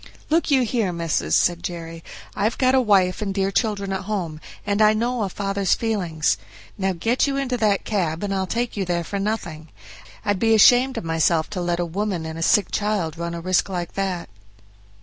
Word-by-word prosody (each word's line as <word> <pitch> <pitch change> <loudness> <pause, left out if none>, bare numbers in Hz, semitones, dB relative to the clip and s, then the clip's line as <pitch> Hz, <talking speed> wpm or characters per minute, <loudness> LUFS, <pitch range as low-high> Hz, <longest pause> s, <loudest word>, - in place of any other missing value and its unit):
"Look 330 +1 +2
you 270 -3 +4
here, 225 -5 0
missis," 165 - 0
said 175 -1 +2
Jerry, 165 -2 -6 0.3
"I've 215 +3 0
got 255 0 +3
a 265 - +5
wife 195 -5 +2
and 200 -2 -2
dear 195 0 0
children 200 -3 -1
at 190 - -4
home, 175 -7 -3 0.2
and 205 +1 0
I 215 0 +6
know 240 +2 -1
a 200 - -1
father's 195 0 0
feelings; 180 -9 0 0.4
now 195 -1 0
get 230 - +1
you 275 -1 -1
into 265 -2 -1
that 210 -4 +1
cab, 175 -5 -1
and 200 -1 -1
I'll 190 -1 -1
take 235 +4 -2
you 200 - -1
there 175 -2 -1
for 200 +4 -4
nothing. 185 -7 -3 0.6
I'd 205 -2 +1
be 225 +1 +4
ashamed 250 +4 +5
of - - -3
myself 165 0 +1
to 190 -3 -3
let 175 0 -1
a 175 - 0
woman 185 -1 -3
and 160 0 -6
a - - -5
sick 200 +4 +3
child 205 -7 -1
run 170 0 -4
a 170 - -5
risk 185 +2 +1
like 175 -2 -4
that." 190 -3 -2
195 Hz, 210 wpm, -22 LUFS, 170-215 Hz, 0.6 s, I